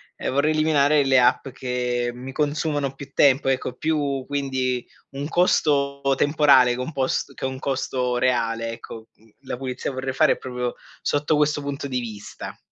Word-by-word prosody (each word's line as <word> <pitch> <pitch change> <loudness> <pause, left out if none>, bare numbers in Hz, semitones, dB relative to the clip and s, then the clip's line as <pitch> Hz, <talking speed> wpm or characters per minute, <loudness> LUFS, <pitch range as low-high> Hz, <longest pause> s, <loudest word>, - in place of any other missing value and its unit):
ehm, - - -3
vorrei 140 +3 +2
eliminare 150 -2 +3
le 135 -1 +4
app 125 +2 +3
che 125 -1 -2
mi 130 +2 -8
consumano 145 -1 -1
più 140 -1 -10
tempo, 135 -1 +4
ecco, 130 -1 -1
più 145 -3 -1
quindi 130 -3 -1 0.2
un 140 +1 -5
costo 145 -5 +2 0.2
temporale 145 -4 +5
che - - -8
è 125 - -2
un 160 - -7
post 130 -1 -1
che - - -11
un 130 0 -4
costo 130 -2 -1
reale, 115 -2 0
ecco. 115 -1 -9
Mhmm, 110 +1 -25
la 130 -2 -5
pulizia 130 +1 -4
vorrei 130 0 -3
fare - - +4
è - - -10
proprio 125 -1 -4 0.3
sotto 150 +1 +1
questo 150 0 +2
punto 140 0 -4
di 125 -1 -1
vista. 110 -4 -8
135 Hz, 175 wpm, -23 LUFS, 125-145 Hz, 0.3 s, temporale